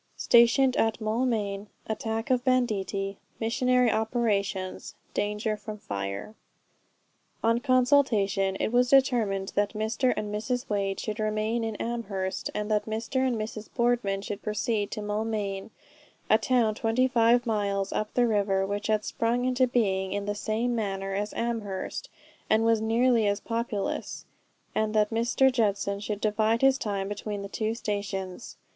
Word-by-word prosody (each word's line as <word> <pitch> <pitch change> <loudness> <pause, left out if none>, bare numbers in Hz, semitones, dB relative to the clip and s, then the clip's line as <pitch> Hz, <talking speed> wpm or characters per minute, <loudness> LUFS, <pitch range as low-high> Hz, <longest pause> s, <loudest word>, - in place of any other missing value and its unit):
STATIONED 245 +2 +5
AT 225 0 +1
MAULMAIN. 215 -3 -1 0.2
ATTACK 225 +2 -3
OF 250 -1 +2
BANDITTI. 205 -6 0 0.2
MISSIONARY 250 +1 +2
OPERATIONS. 205 -4 -1 0.2
DANGER 210 +1 -1
FROM 210 0 -8
FIRE. 100 - -5 1.1
On 230 +1 +3
consultation 245 -7 +3
it - - 0
was 245 +1 +3
determined 230 -8 +3
that 205 +1 +1
Mr. 220 +4 0
and 210 -1 -3
Mrs. 245 +5 -2
Wade 195 -2 -1
should 215 -1 -4
remain 215 +2 0
in 225 -1 -3
Amherst, 200 -5 -3
and 210 +1 -2
that 210 0 +1
Mr. 220 +4 -3
and 260 -2 +2
Mrs. 215 0 -5
Boardman 235 -5 +1
should 205 0 -5
proceed 210 0 -1
to 215 - -5
Maulmain, 210 -1 -2 0.6
a 215 - +6
town 240 -4 +2
25 235 +1 +3
miles 200 -3 -1
up 215 0 -2
the 245 - +4
river, 200 -3 +1
which 205 +1 -3
had 215 -1 +1
sprung 240 +2 0
into 255 0 +2
being 190 -6 0
in 200 0 -2
the 205 - -1
same 220 +4 -1
manner 195 -3 -2
as 205 +2 -2
Amherst, 220 -5 -3 0.4
and 220 +1 +3
was 225 -1 +3
nearly 230 0 +3
as 200 0 +1
populous; 230 -3 -3 0.5
and 215 0 0
that 210 0 +3
Mr. 240 +4 +3
Judson 200 -4 0
should 210 0 -4
divide 220 +2 +1
his 270 0 +5
time 200 -3 -2
between 205 0 -4
the - - -5
two 220 +2 -2
stations. 200 -2 -4
215 Hz, 145 wpm, -27 LUFS, 200-235 Hz, 1.1 s, a